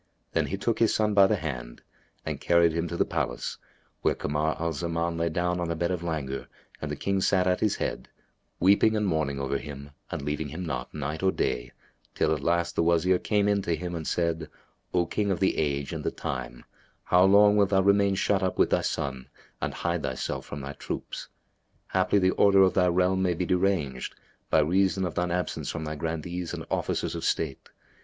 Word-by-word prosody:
Then - - +1
he 100 - -3
took 115 +3 -1
his 115 - +3
son 105 -1 +2
by 100 -1 +7
the 110 - +2
hand 65 -9 -6 0.4
and - - -4
carried 85 -1 +4
him 85 +1 -1
to 85 - -4
the - - +3
palace, - - -3 0.4
where - - +2
Kamar 75 +2 -1
al 85 0 -1
Zaman 85 +1 -2
lay 85 0 0
down 90 +2 -1
on 85 - -1
the 85 - -1
bed 85 +2 -1
of 90 -2 -2
languor 75 -6 -3 0.3
and - - -3
the - - -2
King 100 -1 -1
sat 95 -1 +3
at 90 0 +2
his 105 -2 +1
head, - - -4 0.5
weeping 100 +4 +4
and 105 -1 +1
mourning 80 -6 0
over 70 0 -1
him 70 -1 -9 0.2
and - - -4
leaving 75 +1 -2
him 80 +5 -6
not, 65 -6 -4
night 75 +1 -4
or 95 0 +3
day, - - -2 0.4
till - - +2
at 75 - -3
last 85 +3 0
the - - +2
Wazir 85 +2 +3
came 105 -1 +1
in 100 -1 +2
to 85 -3 0
him 90 0 -5
and 80 -2 -4
said, 85 -2 -1 0.4
"O 90 -1 +2
King 105 +4 -1
of 95 -4 0
the 95 - +2
age 70 -2 -1
and - - -4
the - - +1
time, 60 -1 -5 0.4
how 90 +1 +4
long 105 +2 +6
wilt 100 -2 +4
thou 95 -1 +4
remain 100 0 +3
shut 100 +1 +1
up 95 -1 -1
with - - +3
thy - - +3
son 65 -2 -3 0.3
and - - -1
hide - - -2
thyself 65 - -3
from 75 - -6
thy 70 +1 -6
troops. - - -6 0.7
Haply, 95 +2 +3
the 95 -1 +3
order 100 -1 +5
of 95 - +3
thy 90 -1 +3
realm 90 +1 +2
may 90 -2 +1
be 90 - -1
deranged, 90 -8 0 0.3
by 80 - +4
reason 95 +4 +2
of 85 - -3
shine 90 0 0
absence 90 -1 -2
from 85 - -4
thy 75 0 -3
Grandees 80 +3 -4
and - - -7
Officers - - -1
of - - -5
State. 75 -5 -1
85 Hz, 215 wpm, -27 LUFS, 75-95 Hz, 0.7 s, by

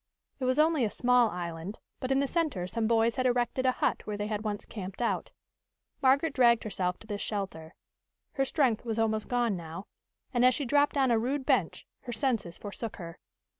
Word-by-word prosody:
It 260 - -2
was 255 +2 +2
only 310 -3 +4
a 220 - +1
small 245 +1 +3
island, 175 +2 -5 0.2
but 255 - -3
in 270 +1 +3
the - - +2
center 290 - -1
some 220 +4 -1
boys 230 0 +2
had 255 0 +2
erected 250 +1 +1
a - - +5
hut - - -1
where 210 -1 -3
they 205 - -2
had 210 0 -3
once 210 -2 -3
camped 195 -2 -7
out. 240 - -1 0.7
Margaret 275 +3 +3
dragged 235 -4 +4
herself 180 -4 -2
to - - -12
this 205 -2 -4
shelter. 190 -6 -4 0.6
Her 270 - 0
strength 260 -6 +1
was 230 -2 -3
almost 220 -1 0
gone 240 -4 +1
now, 170 +2 -7 0.5
and, 245 -1 +2
as 255 0 +6
she 285 - -2
dropped 290 +3 +2
on 265 -3 +3
a 230 - +4
rude 265 +4 -1
bench, 250 - +1
her 250 - -7
senses 225 -7 -1
forsook 210 +2 -6
her. 170 -3 -9
230 Hz, 205 wpm, -29 LUFS, 205-260 Hz, 0.7 s, as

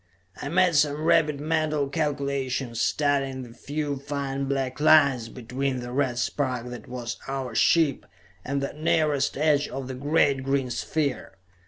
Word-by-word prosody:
I 140 - -4
made 180 +2 +3
some 150 0 +2
rapid 155 -3 +3
mental 155 -1 0
calculations, 140 -5 -2
studying 135 -3 0
the 120 -2 -11
few 145 +3 -3
fine 140 0 -3
black 135 -1 -2
lines 140 -6 +5
between 130 +2 -3
the 120 0 -6
red 130 -2 0
spark 125 -1 -1
that 120 - -9
was 120 -1 -5
our 135 -2 -3
ship, 160 -5 +3 0.4
and 140 +1 -2
the 140 - -3
nearest 150 -2 +1
edge 150 -1 +2
of 135 0 -6
the 130 - -5
great 140 0 +2
green 135 -1 0
sphere. 140 -2 -2
140 Hz, 150 wpm, -26 LUFS, 130-150 Hz, 0.4 s, lines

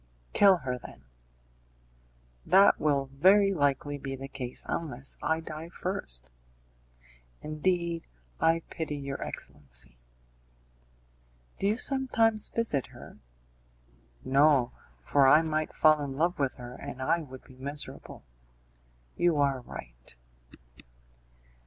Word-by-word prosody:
"Kill 195 -2 +6
her, 125 -1 -2
then." 65 - -12 1.4
"That 195 +3 +5
will 140 -3 0
very 195 +7 +5
likely 145 -2 0
be 135 0 -5
the 135 +1 -7
case 130 -3 -5
unless 140 -5 -3
I 160 0 0
die 160 +1 -8
first." 65 - -5 1.1
"Indeed 170 +2 -1 0.3
I 165 0 +2
pity 160 -2 -4
your 140 -1 -5
excellency." - - -6 1.6
"Do 195 - +1
you 215 +2 +1
sometimes 230 -5 +3
visit 220 - 0
her?" - - -14 1.1
"No, 135 -2 +4 0.3
for 140 - +4
I 155 +4 +6
might 155 -1 -1
fall 155 -1 +4
in 135 -1 -5
love 170 +2 0
with 135 -2 0
her, 125 0 -9
and 125 - -8
I 150 +6 +1
would 130 -5 -10
be 130 - -17
miserable." 140 +3 -6 0.9
"You 175 -3 +2
are 140 -2 +2
right." - - -11
145 Hz, 115 wpm, -29 LUFS, 130-170 Hz, 1.6 s, Kill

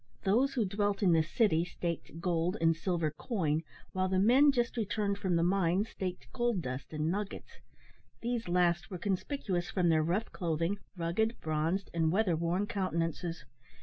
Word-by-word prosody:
Those 250 +8 +2
who 235 -4 +2
dwelt 205 +1 0
in 185 - +5
the 165 -1 +5
city 165 +1 +2
staked 170 -2 -5
gold 175 +2 0
and 165 0 +3
silver 165 -2 -1
coin, 160 - -1 0.3
while 185 0 0
the 190 - +1
men 255 +9 +6
just 240 -3 0
returned 205 -2 -1
from 185 -3 0
the 165 - +3
mines 190 +3 +2
staked 180 -7 -5
gold 240 -7 0
dust 130 +1 -5
and 155 +1 -1
nuggets. 200 +1 -5 0.6
These 235 -2 -2
last 175 -1 +2
were 185 - -5
conspicuous 190 - -2
from 180 -3 +1
their 160 -1 +4
rough 175 +8 -1
clothing, 170 +2 -1 0.2
rugged, 190 +7 0
bronzed, 160 +5 -1
and 165 -2 +2
weather 190 -2 +2
worn 170 +5 0
countenances. 170 -4 -2
180 Hz, 165 wpm, -32 LUFS, 165-205 Hz, 0.6 s, men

